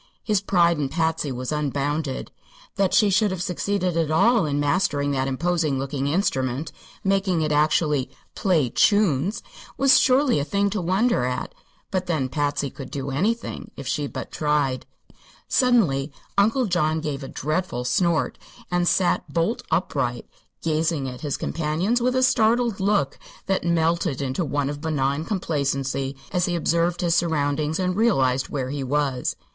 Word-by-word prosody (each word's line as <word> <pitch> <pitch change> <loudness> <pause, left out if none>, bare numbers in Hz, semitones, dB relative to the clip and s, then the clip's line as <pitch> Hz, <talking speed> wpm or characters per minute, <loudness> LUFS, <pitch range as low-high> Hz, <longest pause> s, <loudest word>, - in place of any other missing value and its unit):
His 210 -4 +1
pride 170 -5 +3
in 140 -2 -1
Patsy 160 -3 -1
was 125 +1 -4
unbounded. 145 -1 -2 0.4
That 195 -2 +1
she 210 -2 +4
should 210 +2 +3
have 185 -2 -3
succeeded 185 -1 -1
at 165 -2 +1
all 215 +4 +3
in 145 0 -1
mastering 145 -2 +1
that 135 -1 0
imposing 155 +1 0
looking 135 +1 -2
instrument 140 -4 -1 0.3
making 195 -4 +1
it 155 - -1
actually 150 -2 +2 0.2
"play 160 - +1
chunes" 200 -3 +2 0.3
was 265 -1 +6
surely 260 - +3
a - - 0
thing 200 +7 0
to 210 -1 -2
wonder 190 - +1
at. 125 0 -3 0.4
But 185 -1 -1
then, 150 -7 0
Patsy 145 -1 -1
could 135 - -9
do 140 -2 -4
anything, 215 - -2
if 140 - -7
she 145 +2 -1
but - - -7
tried. 150 -4 0 0.6
Suddenly 175 - +2 0.2
Uncle 225 +6 +3
John 160 -5 +1
gave 150 -3 -4
a - - -6
dreadful 155 -4 -2
snort 170 +3 +1 0.3
and 175 0 +1
sat 180 0 +1
bolt 170 +8 0
upright, - - -1 0.4
gazing 155 -3 0
at 125 -1 -7
his 145 -3 -2
companions 165 +10 -1
with 250 +1 +1
a 260 - +3
startled 235 -3 +2
look 190 -8 +1 0.3
that 195 -1 0
melted 170 -3 +1
into 135 +5 -1
one 145 -1 -1
of 145 0 -5
benign 145 -1 -1
complacency 140 -7 -2 0.2
as 180 -1 +1
he 175 - -1
observed 170 +1 +1
his 170 -2 +2
surroundings 155 -2 0
and 185 -1 -1
realized 135 - +2
where 130 -2 -3
he 145 -1 -3
was. 135 -1 -1
160 Hz, 155 wpm, -24 LUFS, 140-190 Hz, 0.6 s, was